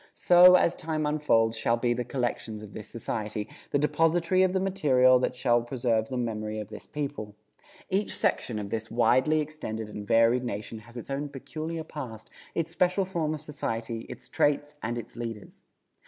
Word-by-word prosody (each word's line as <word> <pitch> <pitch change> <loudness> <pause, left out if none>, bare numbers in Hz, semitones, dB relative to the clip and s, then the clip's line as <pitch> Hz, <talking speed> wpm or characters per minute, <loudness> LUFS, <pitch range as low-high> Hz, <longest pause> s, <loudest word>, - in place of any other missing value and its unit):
So, 180 +1 +8
as 170 - +3
time 155 -1 -2
unfolds, 145 -7 +2
shall 115 +1 +1
be 120 0 +1
the 120 +1 -2
collections 120 -3 -3
of 105 - -11
this 105 - -8
Society, 105 -2 -4 0.2
the - - +2
depository 165 +5 +2
of 185 -1 +4
the 190 - +1
material 130 -10 +4
that 125 - -1
shall 120 -2 +2
preserve 120 -2 0
the 130 - -3
memory 110 -3 -3
of 105 -2 -6
this - - -10
people. 140 -8 -5 0.5
Each 195 +2 -1
section 115 - 0
of 100 -1 -5
this 110 0 -3
widely 130 +7 +3
extended 110 -8 -5
and 105 -1 -7
varied 115 +3 +4
nation 110 -1 -5
has 115 +3 -13
its 120 - -7
own 145 +1 -2
peculiar 160 +4 -5
past, 125 -8 -8 0.2
its 165 0 -1
special 180 +3 +2
form 165 -4 -1
of 150 - -9
society, 115 -6 -4
its - - -10
traits 145 0 +1
and 120 +2 -2
its 120 - -8
leaders. 115 -3 -7
125 Hz, 180 wpm, -28 LUFS, 115-155 Hz, 0.5 s, So